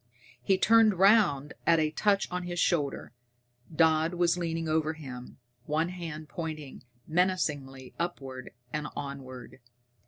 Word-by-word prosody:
He 190 +10 +2
turned 225 0 +5
round 185 -8 +4
at 170 - +6
a 155 -1 +1
touch 200 +4 +1
on 180 0 -2
his 175 -1 -5
shoulder. 150 -9 0 0.6
Dodd 160 +1 +3
was 175 -1 +2
leaning 165 -2 -2
over 155 0 +1
him, 130 -5 -9 0.3
one 160 +3 0
hand 165 -4 -7
pointing 155 -4 -6 0.2
menacingly 150 -7 -1
upward 135 -7 -4 0.2
and 150 -1 -2
onward. 130 -3 -8
160 Hz, 125 wpm, -29 LUFS, 145-175 Hz, 0.6 s, at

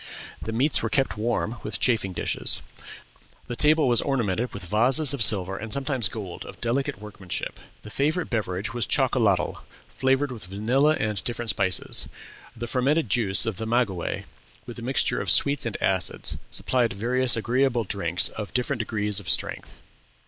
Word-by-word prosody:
The 110 - -5
meats 130 +7 +2
were - - -2
kept 135 -5 0
warm 115 +1 -2
with 105 - -4
chafing 110 -6 +1
dishes. 90 - +1 0.8
The 120 - -5
table 155 +3 +3
was 120 -2 +5
ornamented 120 -4 -1
with 100 -2 -8
vases 125 - +3
of 140 - -4
silver 95 -3 +4
and 110 +1 -7
sometimes 135 -5 +2
gold 100 -6 -7
of - - -12
delicate 120 -2 -1
workmanship. 100 -4 -6 0.2
The 105 - -10
favorite 155 - 0
beverage 105 -2 -2
was 120 -3 -2
chocolatl, 110 -10 +1 0.3
flavored 135 +1 0
with 110 -6 -8
vanilla 125 +11 +1
and 105 -3 -2
different 120 -2 -2
spices. 95 -3 0 0.5
The 120 - -5
fermented 130 +3 0
juice 110 -3 +3
of 110 -4 -3
the 110 - -4
maguey, 110 -7 -1 0.4
with 120 0 -8
a - - -8
mixture 130 +3 +1
of - - -4
sweets 140 -2 +4
and 115 - -4
acids, 95 -2 0
supplied 120 -3 0
various 125 +4 +2
agreeable 120 +1 +1
drinks 90 -2 0
of 105 0 -8
different 125 +1 -1
degrees 105 -2 0
of 95 -3 -6
strength." - - +1
115 Hz, 165 wpm, -25 LUFS, 100-130 Hz, 0.8 s, was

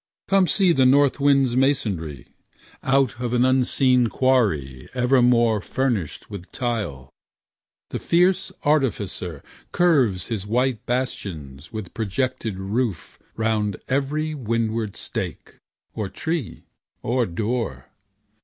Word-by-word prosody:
Come 195 -2 +4
see 190 -1 +3
the 130 -5 +4
north 140 +1 +4
wind's 135 -3 +3
masonry. 100 - 0 0.6
Out 135 -3 +1
of 125 0 -1
an 125 +1 +4
unseen 130 -1 +3
quarry 95 - 0
Furnished 125 - +1
with 100 -2 -9
tile, 105 - -3 0.8
the - - -3
fierce 180 +2 +2
artificer 100 - 0 0.3
Curves 135 - +2
his 105 -4 -3
white 125 +1 0
bastions 85 - -4
with 110 -5 -7
projected 110 -1 -2
roof 100 0 -3 0.2
Round 110 -3 0
every 145 +4 -1
windward 115 -5 -2
stake, - - -5 0.4
or 105 -3 -3
tree, 160 - -4 0.4
or 120 0 +1
door. 115 +7 -3
120 Hz, 105 wpm, -23 LUFS, 100-135 Hz, 0.8 s, Come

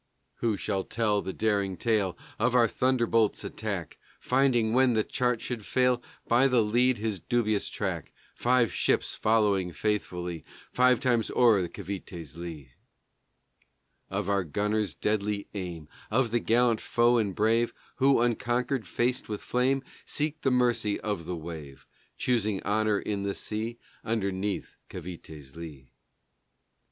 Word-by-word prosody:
Who 115 -3 0
shall 95 0 -1
tell 105 -3 0
the 95 - -4
daring 100 -3 0
tale 105 -2 +1 0.2
Of 125 - +2
our 120 -2 +6
Thunderbolt's 115 -3 +1
attack, - - -4 0.2
Finding, 125 -4 +2
when 130 -1 +4
the 110 - +3
chart 125 0 0
should 120 -4 -4
fail, 125 +1 +2 0.3
By 125 +3 +5
the 125 -4 +3
lead 120 +4 +2
his 105 -2 -2
dubious 110 -1 0
track, - - -3 0.2
Five 120 -4 +2
ships - - +1
following 105 -5 +2
faithfully 90 -4 -2 0.3
Five 125 -1 +4
times 120 -4 +2
o'er 110 -7 +4
Cavité's 85 -5 -7
lee; 80 -6 -8 1.4
Of 100 0 -2
our 100 -1 +2
gunners' 105 +5 -1
deadly 105 -1 -1
aim; 90 -6 -5 0.2
Of 115 +1 +1
the 120 - +2
gallant 115 0 +2
foe 120 0 +3
and 100 -4 -1
brave 115 +2 +2 0.3
Who, 135 -2 +4
unconquered, 120 0 0
faced 125 +6 0
with 105 -1 -4
flame, 130 +2 +1 0.2
Seek 155 +1 -2
the 135 - +2
mercy 120 -4 +2
of 105 -6 -3
the 90 0 -3
wave, 80 -4 -8 0.3
Choosing 110 -5 +1
honor 105 0 +2
in 100 -2 -3
the 100 0 -2
sea 110 +2 -4 0.3
Underneath 100 -2 -2
Cavité's 80 -6 -9
lee? 75 -6 -10
110 Hz, 135 wpm, -28 LUFS, 95-120 Hz, 1.4 s, our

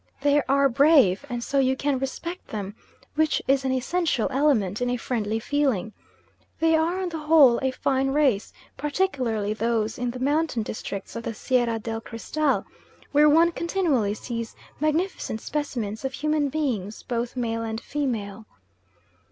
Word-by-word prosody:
They 290 +1 +4
are 280 +1 +4
brave 270 - +4
and 240 -1 -3
so 275 +2 0
you 265 0 +3
can 280 -2 0
respect 335 +7 -5
them, 205 -2 -5 0.4
which 315 0 +2
is 270 0 +3
an 265 - 0
essential 260 -1 0
element 250 -8 +1
in 245 - +1
a 245 - 0
friendly 225 -3 -2
feeling. 235 -5 0 0.7
They 325 0 +4
are 330 +4 +1
on 365 - -2
the 325 -2 -5
whole 300 -6 +6
a 265 - +1
fine 265 +1 0
race, 270 -7 +2 0.3
particularly 260 - -1
those 225 0 -1
in 245 0 -1
the 245 - -5
mountain 285 -2 0
districts 200 -2 -6
of 230 - -3
the 225 -1 -5
Sierra 240 -1 +1
del 225 0 -4
Cristal, 275 +6 -1 0.5
where 295 +1 +6
one 330 +3 +5
continually 325 - 0
sees 230 0 -5 0.2
magnificent 310 - -1
specimens 235 -7 -3
of 265 0 -3
human 300 0 0
beings, 240 -9 -2
both 240 0 -3
male 230 -2 -1
and 225 -1 -3
female. 225 -7 -3
260 Hz, 155 wpm, -25 LUFS, 225-295 Hz, 0.7 s, whole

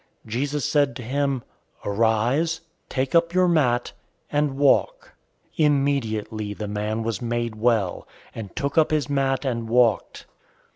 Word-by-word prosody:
005:008 110 - -13
Jesus 140 +3 -1
said 145 -2 +2
to 125 - -7
him, 135 +1 -1 0.4
"Arise, 115 +10 +1 0.3
take 130 0 -2
up 170 +1 +3
your 185 0 +4
mat, 130 -8 +2 0.4
and 145 -2 0
walk." 145 - +2 0.5
005:009 155 - +5
Immediately, 110 -7 -1
the 105 - -5
man 105 +2 -2
was 110 -3 -3
made 120 -1 -2
well, 110 -5 0 0.3
and 110 -4 -8
took 140 +3 +1
up 155 - +3
his 150 -4 0
mat 135 0 0
and 115 -3 -2
walked. 120 -3 +2
130 Hz, 145 wpm, -24 LUFS, 110-145 Hz, 0.5 s, 005:009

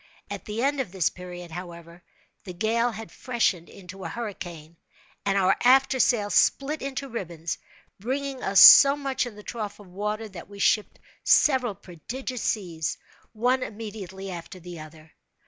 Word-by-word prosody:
At - - -6
the 215 +3 -3
end 280 +1 +1
of 240 -9 -3
this 185 -4 +1
period, 180 -1 -9
however, 170 0 -9 0.4
the 180 - -8
gale 225 +6 +1
had 225 -1 -8
freshened 220 -9 -1
into 190 0 -11
a 165 - -4
hurricane, 175 -7 -7 0.5
and 195 0 +2
our 190 0 +3
after 265 +1 +4
sail 210 -5 +2
split 295 +3 +2
into 275 0 -4
ribbons, 170 -9 -5 0.4
bringing 265 +4 -3
us 195 0 +3
so 280 0 +10
much 275 -3 -2
in 230 - -10
the 210 - -12
trough 215 -3 -6
of 205 - -13
the 180 - -18
water 210 +3 -3
that 190 -2 -11
we 200 - -11
shipped 210 +1 +1 0.3
several 255 -7 +3
prodigious 235 - -7
seas, 170 -7 -2 0.4
one 250 +4 +1
immediately 200 -4 -7
after 175 +1 -8
the 175 -1 -9
other. 155 0 -13
205 Hz, 165 wpm, -26 LUFS, 175-245 Hz, 0.5 s, so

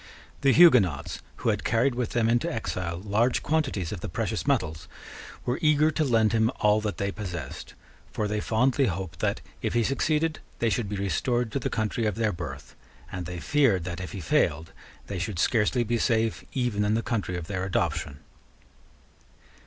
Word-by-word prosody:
The 140 - +5
Huguenots, 95 - +5
who - - -1
had - - 0
carried 120 +3 +2
with 120 -2 -3
them 120 -2 +2
into 120 +1 +1
exile 90 -7 -3
large 110 +5 +1
quantities 135 - 0
of 105 - -4
the - - -4
precious - - -2
metals, 80 +3 0 0.6
were 125 - -1
eager 155 -1 +4
to 155 - 0
lend 115 -5 +3
him 110 0 +3
all 105 0 +3
that 105 -2 -3
they 100 0 -1
possessed; 90 -10 -7 0.4
for 105 - -1
they 105 +1 -1
fondly 130 +5 +2
hoped 95 -3 -4
that, - - 0 0.2
if - - -2
he 120 - +3
succeeded, 155 +5 0 0.2
they 115 -1 +1
should 105 -1 -1
be 105 - -3
restored 120 +4 0
to 140 - -1
the - - -2
country 110 +1 -1
of 105 - -1
their 110 -1 +1
birth; 70 -5 -7 0.4
and 90 -2 -5
they 90 -1 -5
feared 120 - +2
that, 85 0 -5
if 90 - -6
he 95 - -5
failed, 80 +1 +1 0.3
they 100 -2 -4
should 90 +1 -3
scarcely 115 +5 +2
be 120 +1 -1
safe 115 0 +1
even 120 -6 0
in 105 +1 +2
the 115 - 0
country 105 -6 -2
of 85 - -5
their 95 0 -3
adoption. 80 -6 -1
105 Hz, 185 wpm, -27 LUFS, 90-120 Hz, 0.6 s, The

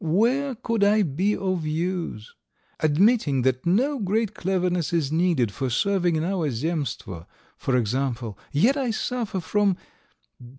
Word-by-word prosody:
Where 240 - +1
could 230 -1 -1
I 210 +1 +4
be 185 +6 0
of 185 -3 -1
use? 165 - -3 0.5
Admitting 155 - +3
that 130 +3 0
no 260 +10 +2
great 215 +1 0
cleverness 180 -4 -1
is 160 -5 0
needed 160 - +2
for 130 +4 -3
serving 175 - +1
in 155 - 0
our 175 -4 0
Zemstvo, 130 - -3 0.3
for 130 -2 0
example, 120 -1 -1 0.2
yet 220 - +3
I 270 -4 -1
suffer 225 -3 -2
from 200 +1 +1
175 Hz, 135 wpm, -24 LUFS, 140-205 Hz, 0.5 s, I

